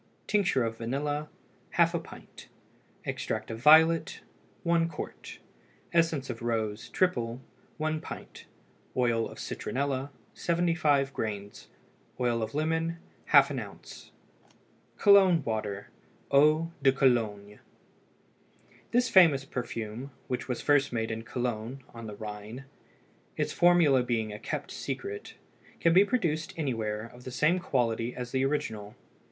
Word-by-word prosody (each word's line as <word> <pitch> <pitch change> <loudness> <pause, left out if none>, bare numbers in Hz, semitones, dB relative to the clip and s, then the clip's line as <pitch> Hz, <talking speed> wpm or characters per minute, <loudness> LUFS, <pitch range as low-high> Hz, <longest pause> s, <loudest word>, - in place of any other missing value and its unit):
Tincture 195 - +2
of 115 0 -3
vanilla 145 +5 -2 0.5
½ - - +3
pint. - - -13 0.6
Extract - - -3
of 115 - -5
violet 160 +4 +5 0.4
1 170 -1 +2
qt. 155 - -8 0.6
Essence 165 -5 +2
of 120 -2 -6
rose 110 -1 -2
(triple) 120 -10 0 0.4
1 155 0 -1
pint. - - -9 0.5
Oil 120 -2 +1
of - - -12
citronella 135 0 -3 0.2
75 165 -6 +1
grains. 100 -2 -5 0.5
Oil 120 -2 +1
of 110 +4 -4
lemon 160 +2 0 0.3
½ - - +5
oz. - - -12 0.9
COLOGNE 190 -6 +6
WATER 105 -3 -3 0.4
(EAU 155 +4 +4
DE 135 -1 +5
COLOGNE). 110 -6 +1 1.3
This 245 +1 +2
famous 165 -10 +6
perfume, 120 -1 -5 0.2
which 125 - -3
was 125 -2 -3
first 145 -1 +3
made 115 -2 -2
in 110 0 -3
Cologne 120 +1 -4
on 115 -1 -8
the 105 - -7
Rhine, 105 +4 -8 0.7
its - - -1
formula 170 -7 +5
being 115 -3 -1
kept - - -4
secret, 420 +1 -5 0.4
can 165 - +3
be 190 +3 +7
produced 170 -9 -1
anywhere 110 -8 -2
of 125 0 -14
the 130 - -6
same 150 +8 +2
quality 120 -7 -1
as 125 -1 -6
the 130 0 +1
original. 110 -7 -2
130 Hz, 120 wpm, -29 LUFS, 115-160 Hz, 1.3 s, be